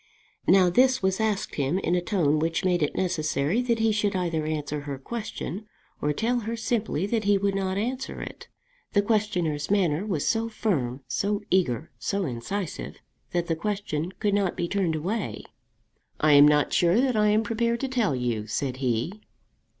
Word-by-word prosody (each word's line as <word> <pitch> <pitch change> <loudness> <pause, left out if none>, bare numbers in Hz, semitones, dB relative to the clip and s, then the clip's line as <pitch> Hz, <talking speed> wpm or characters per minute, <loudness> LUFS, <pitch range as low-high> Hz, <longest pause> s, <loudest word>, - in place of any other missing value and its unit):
Now 185 -2 +6
this 260 +3 +4
was 190 +1 +1
asked 215 -1 -1
him 140 +5 +1
in 185 -2 0
a 180 - +2
tone 165 -6 +1
which 165 +3 -1
made 180 -2 +2
it 150 - 0
necessary 165 - 0
that 240 -2 +1
he 225 0 +2
should 210 -2 0
either 165 -4 -1
answer 150 -1 -2
her 140 -1 -5
question 210 - -6 0.3
or 150 - +1
tell 235 +10 0
her 230 +1 -3
simply 220 -6 -1
that 220 0 -1
he 205 0 +4
would 200 0 0
not 190 -1 -1
answer 250 +5 -3
it. - - -8 0.5
The 205 - +4
questioner's 185 -9 0
manner 185 -5 +2
was 185 -9 -1
so 225 0 +1
firm, 140 - -1
so 200 - -1
eager, 165 -5 +1
so 200 -1 -1
incisive, 150 +8 -4 0.3
that 175 -1 -1
the 165 - 0
question 180 -3 -3
could 205 +1 -1
not 200 -3 +1
be 170 - -1
turned 185 -4 0
away. 195 +7 -3 0.8
"I 155 - +4
am 145 +1 +9
not 150 0 +3
sure 175 +5 +4
that 255 -2 +2
I 210 0 +3
am 215 +1 +3
prepared 235 +1 0
to 270 - 0
tell 240 - +1
you," 120 -4 -2
said 130 +4 -2
he. 130 - -1
190 Hz, 180 wpm, -26 LUFS, 155-215 Hz, 0.8 s, am